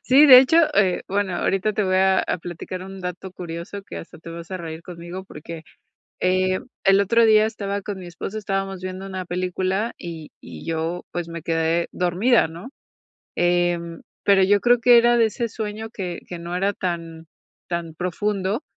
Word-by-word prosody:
Sí, 280 +2 +6
de 255 -3 +11
hecho, 265 +5 +4 0.2
eh, 195 -3 +2
bueno, 195 -1 0
ahorita 195 +4 0
te 210 - 0
voy 185 -1 +1
a 190 0 +4
a - - -2
platicar 175 +2 -7
un 195 0 -9
dato 180 +1 -6
curioso 175 +3 -7
que - - -9
hasta - - -10
te 165 - -10
vas 170 +1 -9
a 185 - -3
reír 165 -1 -7
conmigo, 175 +1 -8
porque, 165 -2 -9 0.6
eh, 185 0 +2 0.2
el 195 0 +5
otro 230 +4 +4
día 215 -1 +6
estaba 200 -2 -3
con 200 0 -5
mi 185 - -9
esposo. 185 +5 -6
Estábamos 195 -2 -3
viendo 185 +1 -6
una 190 -1 -5
película 185 +4 -1
y 165 -3 -8
y - - -11
yo 165 +2 -2
pues, 175 -1 -4
me 170 0 -6
quedé 165 +1 0
dormida, 180 +3 +2
¿no? 170 +9 -9 0.7
Em, 175 -1 0 0.2
pero 195 -1 +5
yo 205 +2 +4
creo 245 0 +4
que 240 +1 +7
era 240 +1 +5
de 230 - +5
ese 230 +2 -3
sueño 220 0 -5
que 185 -6 -5
que 175 - -7
no 170 +1 -5
era 195 +3 +1
tan 165 -3 -4 0.4
tan 170 -2 -4
profundo, 195 - -2
185 Hz, 185 wpm, -23 LUFS, 170-205 Hz, 0.7 s, de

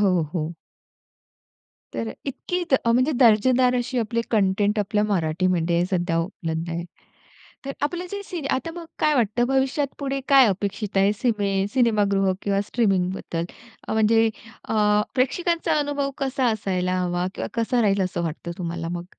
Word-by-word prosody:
हो, 185 -4 +3
हो. 160 -1 -2 1.4
तर 115 -1 -3
इतकी 355 +6 -3 0.2
अ, 230 - +4
म्हणजे 255 +5 +3
दर्जेदार 250 +3 +5
अशी 250 +1 -2
आपली 230 +1 -1
कंटेंट 205 0 +2
आपल्या 210 +1 +1
मराठीमध्ये 175 -2 +1
सध्या 175 -2 0
उपलब्ध 165 -2 -4
आहे. 170 +1 -3 0.8
तर 275 - -3
आपलं 350 +5 -2
जे 405 0 -4
सिन 340 -7 -6
आता 330 +5 -1
मग 345 -1 -7
काय 305 0 +3
वाटत 230 -2 +1
भविष्यात 270 +2 +1
पुढे 275 -1 -2
काय 275 -2 +7
अपेक्षित 200 +1 -2
आहे 195 +1 +4
सिमे 200 -4 0
सिनेमागृह 205 -6 +2
किंवा 200 -1 +1
स्ट्रीमिंग 195 -6 +1
बद्दल? 170 -3 -4 0.4
अ, - - -2
म्हणजे 225 +1 +4 0.4
अ, - - 0 0.4
प्रेक्षकांचा 335 +6 +1
अनुभव 285 -1 -1
कसा 265 -1 0
असायला 185 -3 -1
हवा 175 0 -1
किंवा - - -3
कसा 240 +1 +1
राहील 200 -2 +2
असं 180 -2 -2
वाटत 165 +1 -5
तुम्हाला 170 -2 -4
मग? 175 0 -4
210 Hz, 150 wpm, -24 LUFS, 185-255 Hz, 1.4 s, काय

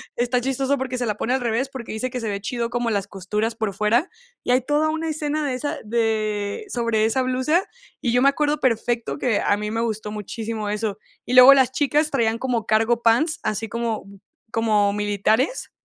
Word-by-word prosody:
Está 245 +1 +1
chistoso 270 +2 0
porque 260 -1 -3
se 245 - -1
la 210 -2 -1
pone 245 - -1
al 265 - 0
revés, 240 +3 0
porque 260 -4 -7
dice 220 +4 -3
que 250 -1 -5
se 220 - -2
ve 200 -1 -2
chido 235 +3 -2
como 240 -1 -1
las 200 -2 -1
costuras 210 +4 -2
por 220 -3 -2
fuera, 225 - +1 0.3
y - - 0
hay 255 - +4
toda 295 +4 +1
una 320 +1 -2
escena 300 0 -2
de 265 - -1
esa 290 +3 -3
de 215 - -1
sobre 230 -3 0
esa 245 +4 +1
blusa, 260 +8 +1 0.4
y 240 - 0
yo 245 - +3
me 275 - +6
acuerdo 295 +1 0
perfecto 235 0 0
que 245 -6 0
a 205 - +2
mí 210 0 -4
me 225 +1 -1
gustó 215 -2 -3
muchísimo 215 0 -4
eso. 210 -1 -2 0.3
Y 245 - -3
luego 255 +2 +10
las 260 -2 +3
chicas 295 +2 +1
traían 230 -4 +1
como 240 -3 -1
cargo 225 +2 +2
pants, 300 +9 +3
así 220 +1 -2
como 230 -1 -3 0.5
como 210 -3 +2
militares, 210 - 0
235 Hz, 205 wpm, -22 LUFS, 215-265 Hz, 0.5 s, luego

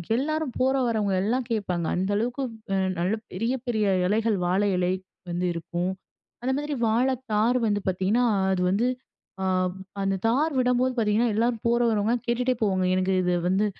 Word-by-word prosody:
எல்லாரும் 310 +1 -1
போற 265 +1 +3
வரவங்க 215 -4 0
எல்லாம் 245 +4 0
கேப்பாங்க. 185 -6 -1
அந்த 185 +2 -1
அளவுக்கு 245 +5 -2 0.6
நல்ல 185 +5 +1 0.2
பெரிய 230 +7 -1
பெரிய 215 -3 +1 0.2
இலைகள், 215 +2 +1
வாழை 195 +3 +2
இலை 180 0 +1 0.4
வந்து 175 +1 -1
இருக்கும். 175 +2 -3 0.5
அந்த 260 - +1
மாரி 295 +1 -3
வாழை 245 +4 +2 0.2
தார் 230 +4 +3
வந்து 205 -1 +1
பார்த்தீங்கன்னா, 190 +7 +1 0.3
அது 180 - -1
வந்து 215 +6 +2 0.6
அ - - 0 0.6
அந்த 195 0 +1
தார் 290 +8 +2
விடம்போது 250 +1 +2
பார்த்தீங்கன்னா, 220 +1 +2
எல்லாரும் 230 0 0
போற 235 0 +3
வரவங்கலாம் 225 +2 0
கேட்டுட்டே 250 +2 +1
போவாங்க. 190 -3 +1
எனக்கு 185 +1 +1
இது 180 0 +1 0.2
வந்து 195 +3 +2
220 Hz, 155 wpm, -26 LUFS, 190-245 Hz, 0.6 s, போற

